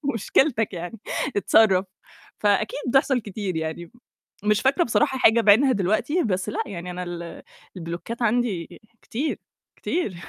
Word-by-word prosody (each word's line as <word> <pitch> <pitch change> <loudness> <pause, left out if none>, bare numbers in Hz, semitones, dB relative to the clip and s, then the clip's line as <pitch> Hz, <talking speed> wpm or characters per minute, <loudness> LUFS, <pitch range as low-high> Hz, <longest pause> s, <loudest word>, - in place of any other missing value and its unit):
مشكلتِك 225 0 +1
يعني، 175 +5 -6 0.4
اتصرَّف. 195 -1 +4 0.5
فأكيد 210 +4 +1
بتحصَل 270 0 +3
كتير 200 -3 -5
يعني، 160 +1 -4 0.5
مش 210 0 +2
فاكرة 275 +6 +3
بصراحة 265 +2 +1
حاجة 230 -1 +5
بعينها 225 +6 +5
دلوقتي 215 - 0
بس 190 -2 -1
لأ - - -2
يعني 180 -2 -7
أنا 180 0 -5
ال 170 -1 -7 0.3
البلوكات 170 +7 -6
عندي 225 -7 -1 0.2
كتير، 280 +7 -3 0.4
كتير. 325 - -2
210 Hz, 130 wpm, -24 LUFS, 180-240 Hz, 0.5 s, حاجة